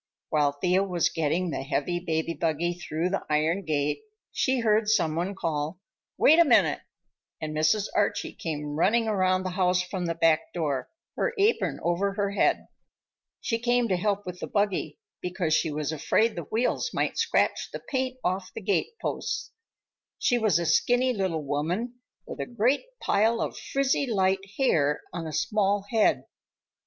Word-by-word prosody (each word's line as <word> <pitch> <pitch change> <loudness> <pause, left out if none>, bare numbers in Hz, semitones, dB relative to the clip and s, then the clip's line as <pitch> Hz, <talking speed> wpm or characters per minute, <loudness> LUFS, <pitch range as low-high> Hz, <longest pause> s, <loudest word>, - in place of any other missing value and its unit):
While 145 -2 +2
Thea 180 +6 +1
was 180 -4 +1
getting 165 +3 -1
the - - -3
heavy 150 +5 -1
baby 165 -1 -1
buggy 165 +1 -1
through 175 0 -3
the 195 - -1
iron 155 +5 +1
gate 150 - 0 0.3
she 260 -2 +1
heard 215 -1 +2
some 175 -8 +2
one 180 +4 -2
call, 160 -1 -2 0.4
"Wait 320 +3 +6
a - - +9
minute!" 310 - +4 0.6
and 155 -1 -4
Mrs. 155 +7 +2
Archie 205 -1 0
came 150 -3 -4
running 225 +8 +2
around 185 -3 +2
the 185 - -3
house 180 -1 +2
from 180 -1 -4
the 165 - -1
back 165 -1 +2
door, 145 -6 -2 0.3
her 485 - 0
apron 415 +3 +1
over 185 +4 0
her 200 -1 -1
head. 200 - +1 0.8
She 230 -2 -1
came 240 0 +2
to 185 - +2
help 205 +2 -1
with 180 0 -7
the - - -5
buggy, 200 -7 -1 0.2
because 180 -3 -1
she 160 - +2
was 150 0 -2
afraid 215 +9 +1
the 170 -3 -5
wheels 235 - 0
might - - -1
scratch 460 - +1
the - - -5
paint 260 -1 -3
off 185 +1 -1
the - - -5
gateposts. 210 - -2 0.7
She 245 -2 +2
was 215 -7 +3
a 170 - -1
skinny 250 +8 +3
little 185 -7 -1
woman 175 - -2 0.3
with - - -8
a - - -3
great 245 - +1
pile 225 +3 +2
of - - -2
frizzy 275 0 0
light 190 -3 +1
hair 150 - +2
on 165 -2 -4
a - - -5
small 205 0 +1
head. 225 -2 +3
185 Hz, 170 wpm, -27 LUFS, 160-220 Hz, 0.8 s, a